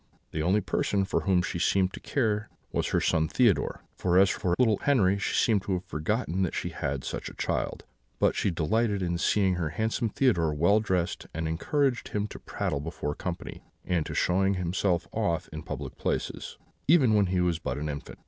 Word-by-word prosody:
The 80 - -2
only 95 +6 +2
person 100 +1 0
for 95 - 0
whom 95 -3 +2
she 85 - -3
seemed 95 +1 +2
to - - -7
care 110 -5 -1 0.2
was - - 0
her - - +1
son 80 0 +2
Theodore; 115 +1 +2
for 90 -1 +1
as 95 0 +6
for 90 -1 0
little 110 -5 +4
Henri, 100 -9 +3
she - - -1
seemed 110 -4 +3
to 95 - -2
have 90 0 -2
forgotten 90 - -1
that 90 - 0
she - - -2
had 65 -1 -3
such - - -4
a - - -13
child; - - -2 0.3
but - - +2
she - - +1
delighted 100 +5 0
in 85 -1 -1
seeing 95 -1 +2
her 85 -3 -1
handsome 110 - -1
Theodore 85 - +2
well 85 +8 +4
dressed, 95 -5 -1
and 80 0 -2
encouraged 125 - 0
him 105 0 -2
to - - -9
prattle 70 - -3
before 75 -1 -4
company, 85 +2 -6 0.2
and 90 -3 +1
to - - -5
show 90 +2 +2
himself 90 -2 +1
off 90 -6 -1
in 75 - -5
public - - -6
places, - - -3 0.3
even 135 -7 +5
when 100 -2 +4
he 90 0 0
was 90 -2 +1
but 65 -5 -3
an 75 +1 -3
infant. 70 -1 -6
95 Hz, 200 wpm, -28 LUFS, 85-105 Hz, 0.3 s, as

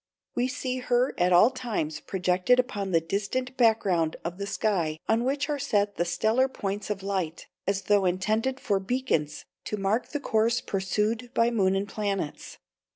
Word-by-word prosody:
We 245 +1 +1
see 255 0 -3
her 250 +1 +1
at 180 +1 +3
all 180 +8 +6
times 215 -12 -3
projected 185 +7 +1
upon 205 -6 -1
the 170 -3 +4
distant 205 +10 -2
background 205 -9 +2
of 175 +2 -4
the 200 - -3
sky 185 -6 0
on 230 +1 +2
which 280 +3 0
are 295 -2 -2
set 205 -7 0
the 175 - +1
stellar 220 +9 +2
points 205 -5 -4
of 200 -2 -3
light, 185 -5 -2 0.2
as 195 0 0
though 205 -2 +3
intended 215 +8 0
for 200 -1 0
beacons 190 - -1 0.2
to 210 - -3
mark 200 +4 0
the 290 - -4
course 230 -2 +1
pursued 210 +5 -1
by 230 +1 +3
moon 195 -4 +2
and 195 +1 -1
planets. 200 -6 -3
205 Hz, 170 wpm, -27 LUFS, 190-245 Hz, 0.2 s, all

